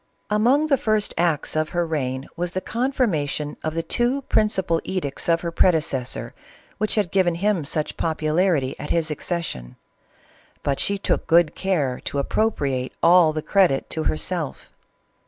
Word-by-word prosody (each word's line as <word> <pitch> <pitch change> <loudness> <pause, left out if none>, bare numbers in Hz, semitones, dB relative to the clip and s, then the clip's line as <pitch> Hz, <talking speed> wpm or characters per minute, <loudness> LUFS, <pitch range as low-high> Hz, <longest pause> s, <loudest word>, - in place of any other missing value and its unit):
Among 245 +8 +3
the 280 -3 +2
first 215 -1 0
acts 165 -4 0
of 155 0 0
her 175 - +2
reign 135 -4 -3
was 175 0 -3
the 185 - 0
confirma 230 - 0
tion 150 +1 -4
of 155 0 -2
the 165 - -1
two 250 +8 0
principal 190 -8 +1
edicts 175 -5 -3
of 165 0 +3
her 170 - -3
predecessor, 135 -9 +1 0.5
which 215 +1 0
had 205 -6 0
given 180 -3 +2
him 195 -1 0
such 150 +2 -2
popularity 155 -2 +1
at 150 - -6
his 160 -2 0
accession; 150 - -4 0.9
but 140 -1 0
she 200 - +1
took 195 - -1
good 170 -1 +4
care 155 -10 -1
to - - -3
appropriate 140 -6 -1
all 170 -1 +6
the 155 0 -4
credit 175 -6 +2
to 160 - -3
herself. 160 -1 -2
165 Hz, 155 wpm, -23 LUFS, 150-195 Hz, 0.9 s, all